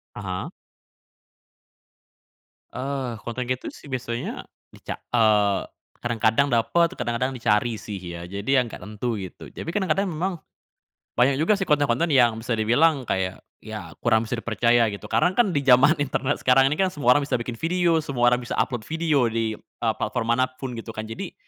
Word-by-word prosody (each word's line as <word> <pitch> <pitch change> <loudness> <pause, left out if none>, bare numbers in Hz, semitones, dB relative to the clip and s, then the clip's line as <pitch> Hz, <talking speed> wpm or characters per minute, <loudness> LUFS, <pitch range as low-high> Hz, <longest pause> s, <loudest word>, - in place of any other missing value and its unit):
Aha. 95 -3 -4 2.2
Eee, 130 -3 -3
konten 120 +2 -3
gitu 125 0 -2
sih 140 - -13
biasanya 120 -2 -4 0.2
dica - - -7 0.2
eee, 105 -4 +3 0.3
kadang-kadang 120 +2 +2
dapet 165 +10 +2
kadang-kadang 125 +3 -2
dicari 115 0 +1
sih 105 -2 -6
ya. 85 -2 -7
Jadi 100 +1 -6
yang 125 -3 +2
nggak - - -8
tentu 110 +2 -4
gitu. 95 -3 -9
Tapi - - -6
kadang-kadang 195 0 +1
memang 180 +2 -2 0.8
banyak 130 +3 +4
juga 200 +6 +3
sih 195 - -2
konten-konten 145 +1 +2
yang 120 -4 +4
bisa 115 +1 -2
dibilang 130 +7 +3
kayak 95 -1 -1 0.2
ya - - -7
kurang 110 -1 +2
bisa 125 - -1
dipercaya 120 0 +2
gitu. 100 - -9
Karena 120 +12 +2
kan 220 +1 +3
di 140 -4 -1
zaman 135 +5 +6
internet 145 0 -1
sekarang 135 +1 +4
ini 150 - -1
kan 190 -1 +1
semua 125 -3 +4
orang 145 - 0
bisa 140 - -5
bikin 120 -1 -4
video, 170 +2 +2
semua 130 -6 +2
orang 125 0 +2
bisa - - -4
upload 120 -4 -3
video 160 -5 +1
di 115 -1 -1
eee, 115 -2 -3
platform 115 +2 -2
mana 130 - +4
pun 130 -1 -7
gitu 115 0 -7
kan. 110 0 -6
Jadi, 115 - -6
125 Hz, 170 wpm, -24 LUFS, 110-145 Hz, 2.2 s, zaman